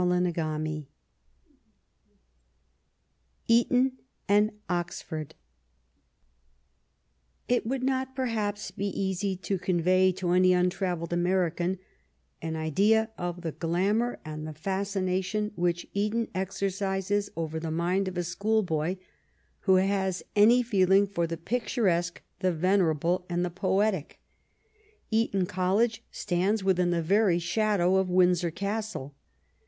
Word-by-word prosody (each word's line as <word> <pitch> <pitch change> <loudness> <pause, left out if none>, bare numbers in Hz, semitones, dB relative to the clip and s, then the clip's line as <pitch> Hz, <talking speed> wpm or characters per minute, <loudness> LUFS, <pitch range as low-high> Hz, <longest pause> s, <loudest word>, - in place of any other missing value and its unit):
CHAPTER 170 -4 0
II 155 -2 -4 2.6
ETON 250 +3 +4 0.4
AND 210 +2 +4 0.2
OXFORD 175 -3 -4 2.1
It 245 -2 +1
would 260 +1 -2
not, 265 0 -1
perhaps, 215 -5 -2
be 200 -1 -3
easy 195 0 -1
to 190 +1 -3
convey 185 +1 +3
to 180 -1 -2
any 185 0 +5
untravelled 180 -2 0
American 175 0 0 0.6
an 160 0 -3
idea 205 +8 +2
of 175 -2 -4
the 165 - -2
glamour 195 +10 0
and 155 0 -6
the 155 - -7
fascination 195 +3 -1
which 175 -2 -1
Eton 215 +3 0
exercises 195 +1 -1
over 160 -1 -3
the 160 0 -4
mind 175 +4 0
of 185 -1 -5
a 175 - 0
schoolboy 180 -3 0 0.6
who 190 -2 +3
has 190 -1 +1
any 230 +4 +6
feeling 195 -3 +4
for 170 -4 -2
the 165 0 -4
pictu 240 - -2
resque, 175 -2 +1 0.2
the 185 -1 +1
venerable, 175 0 +1
and 175 0 0
the 175 - -4
poetic. 190 -1 0 0.9
Eton 220 -4 +1
College 205 +6 0
stands 190 +4 0
within 180 -2 +2
the 170 -1 0
very 195 +1 +3
shadow 185 +1 +2
of 190 -1 +1
Windsor 180 -1 +3
Castle. 200 -5 -4
185 Hz, 115 wpm, -28 LUFS, 175-205 Hz, 2.6 s, any